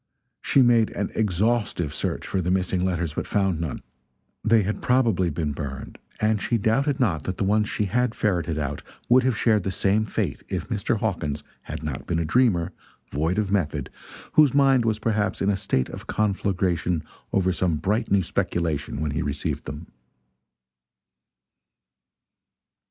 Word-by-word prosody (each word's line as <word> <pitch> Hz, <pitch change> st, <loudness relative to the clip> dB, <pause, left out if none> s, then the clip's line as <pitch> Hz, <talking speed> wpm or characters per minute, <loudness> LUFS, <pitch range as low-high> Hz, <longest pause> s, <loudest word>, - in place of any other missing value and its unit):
She 135 Hz, -, +4 dB
made 120 Hz, -2 st, +4 dB
an 100 Hz, -, -2 dB
exhaustive 105 Hz, -5 st, 0 dB
search -, -, -3 dB
for 95 Hz, -, -1 dB
the 90 Hz, -, -2 dB
missing 95 Hz, 0 st, +1 dB
letters, 85 Hz, -4 st, -1 dB
but -, -, -3 dB
found 95 Hz, -5 st, +1 dB
none. 80 Hz, -5 st, -4 dB, 0.6 s
They 110 Hz, -1 st, +4 dB
had 105 Hz, +3 st, -3 dB
probably 115 Hz, -8 st, +2 dB
been 75 Hz, -1 st, -2 dB
burned; 70 Hz, -1 st, -6 dB, 0.2 s
and 105 Hz, -1 st, +1 dB
she 120 Hz, -, +1 dB
doubted 135 Hz, +7 st, +1 dB
not 95 Hz, -, +1 dB
that 95 Hz, -, -3 dB
the -, -, 0 dB
ones 105 Hz, +2 st, +2 dB
she 105 Hz, -, -1 dB
had 120 Hz, +3 st, 0 dB
ferreted 85 Hz, -6 st, 0 dB
out 75 Hz, -1 st, -3 dB, 0.3 s
would 125 Hz, +2 st, +7 dB
have 130 Hz, -3 st, +1 dB
shared 110 Hz, -3 st, +3 dB
the 95 Hz, -, -2 dB
same 100 Hz, +3 st, +1 dB
fate -, -, -2 dB
if -, -, -3 dB
Mr. 105 Hz, +3 st, 0 dB
Hawkins 85 Hz, -9 st, -2 dB, 0.2 s
had -, -, -7 dB
not 75 Hz, -4 st, -5 dB
been 85 Hz, -, 0 dB
a 85 Hz, -, 0 dB
dreamer, 90 Hz, -3 st, +2 dB, 0.4 s
void 80 Hz, +6 st, 0 dB
of 105 Hz, -2 st, 0 dB
method, 75 Hz, -9 st, -1 dB, 0.4 s
whose 150 Hz, -4 st, +5 dB
mind 135 Hz, -4 st, +4 dB
was 110 Hz, -2 st, +1 dB
perhaps 105 Hz, -1 st, 0 dB
in 100 Hz, -, +2 dB
a -, -, +1 dB
state 95 Hz, -10 st, 0 dB
of -, -, -9 dB
conflagration 95 Hz, -5 st, 0 dB, 0.3 s
over 95 Hz, -1 st, +2 dB
some 90 Hz, -3 st, +1 dB
bright 100 Hz, +9 st, 0 dB
new 100 Hz, -1 st, +3 dB
speculation 80 Hz, -4 st, -2 dB
when 75 Hz, -2 st, -1 dB
he 75 Hz, -, -1 dB
received 70 Hz, 0 st, -3 dB
them. 75 Hz, +5 st, -7 dB
95 Hz, 165 wpm, -25 LUFS, 80-110 Hz, 0.6 s, would